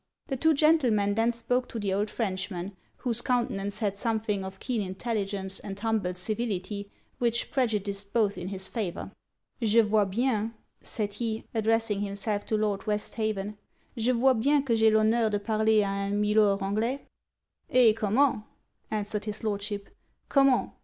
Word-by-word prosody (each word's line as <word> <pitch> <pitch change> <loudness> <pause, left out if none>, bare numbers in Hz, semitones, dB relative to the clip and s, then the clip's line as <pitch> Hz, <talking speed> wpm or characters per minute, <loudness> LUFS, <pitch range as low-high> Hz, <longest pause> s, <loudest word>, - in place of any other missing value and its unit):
The 270 - 0
two 320 +4 +3
gentlemen 255 -10 +3
then 225 +3 +2
spoke 245 +2 -1
to - - -6
the 200 -3 -1
old 205 +2 0
Frenchman; 190 -3 -3 0.2
whose 240 -2 0
countenance 210 -5 -1
had 200 -2 0
something 215 -2 -1
of 190 0 -8
keen 245 -4 -2
intelligence 195 -1 -3
and 195 -1 -7
humble 215 -5 0
civility 200 0 -3 0.3
which 235 -1 +1
prejudiced 205 -6 -1
both 210 -4 +2
in 180 0 -6
his 190 -1 -3
favour. 195 -6 -4 0.5
'Je 225 0 +4
vois 210 -1 +2
bien,' 230 +1 0 0.3
said 205 -2 -3
he, 220 0 -3
addressing 225 -2 +1
himself 205 +1 -2
to 220 - +1
Lord 210 -1 -1
Westhaven, 210 -1 -1 0.4
'je 235 +1 +2
vois 260 +2 +4
bien 275 +5 +2
que 240 -4 +1
j'ai 220 0 +5
l'honneur 220 +1 +3
de 205 - 0
parler 220 +1 +2
a 200 - 0 0.2
un 200 - -2
Milor 210 -1 +3
Anglais.' 220 +7 -1 0.6
'Eh! 245 -3 +6
comment?' 225 +3 +2 0.5
answered 210 -1 -2
his 210 +1 -3
Lordship 205 -1 -2 0.4
'_comment? 275 -2 +4
215 Hz, 155 wpm, -28 LUFS, 200-230 Hz, 0.6 s, Eh